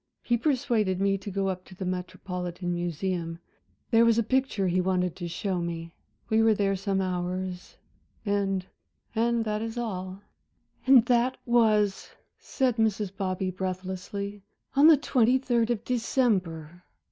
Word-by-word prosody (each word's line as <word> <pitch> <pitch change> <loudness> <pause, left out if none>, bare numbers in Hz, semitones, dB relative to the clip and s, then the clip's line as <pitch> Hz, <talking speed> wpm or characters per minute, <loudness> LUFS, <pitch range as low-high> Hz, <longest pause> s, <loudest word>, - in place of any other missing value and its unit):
He 240 - +2
persuaded 235 - +1
me 195 0 +2
to 205 - -7
go 195 0 -1
up 185 -1 -3
to 185 - -14
the 190 - -5
Metropolitan 180 -1 -4
Museum 175 0 -2 0.5
there 230 0 +6
was 230 -1 +4
a 230 - +3
picture 260 -5 0
he 180 +1 +2
wanted 180 -1 0
to 175 - -4
show 180 +2 -2
me. 170 -1 -5 0.3
We 220 -1 +3
were 225 -1 +4
there 195 -1 +1
some 195 0 -1
hours. 180 0 -3 0.5
And 195 -2 0 0.5
and 230 0 +1
that 210 0 -1
is 225 +1 -4
all." 190 -4 -4 0.6
"And 260 -3 +7
that 245 +1 +2
was," 215 -4 +2 0.3
said 255 -4 0
Mrs. 210 -3 0
Bobby 185 -1 -2
breathlessly, 190 +2 -5 0.3
"on 285 +3 +7
the 320 -2 +8
twenty 255 -3 +3
third 240 -3 +1
of 235 -2 -1
December. 190 - 0
195 Hz, 145 wpm, -27 LUFS, 185-230 Hz, 0.6 s, the